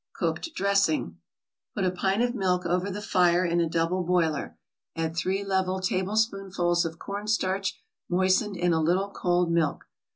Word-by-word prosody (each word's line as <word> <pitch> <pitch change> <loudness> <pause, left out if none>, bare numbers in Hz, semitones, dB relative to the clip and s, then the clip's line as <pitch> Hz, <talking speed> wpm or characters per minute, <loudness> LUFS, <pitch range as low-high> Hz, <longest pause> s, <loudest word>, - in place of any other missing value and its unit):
COOKED 330 - -2
DRESSING 195 - +1 0.6
Put 195 - 0
a 180 - +2
pint 195 +4 0
of 245 0 0
milk 185 -5 0
over 180 +3 0
the 205 +2 -5
fire 180 -2 +3
in 170 0 +1
a 165 - 0
double 170 +3 0
boiler, 165 -4 0 0.4
add 165 0 -2
three 190 +3 -1
level 190 -1 0
tablespoonfuls 190 -2 0
of 165 0 -5
cornstarch 200 -1 -2 0.3
moistened 190 +2 +2
in 175 0 +2
a 160 - +2
little 185 +5 +1
cold 175 -2 +1
milk. 165 -4 0
185 Hz, 155 wpm, -27 LUFS, 175-195 Hz, 0.6 s, fire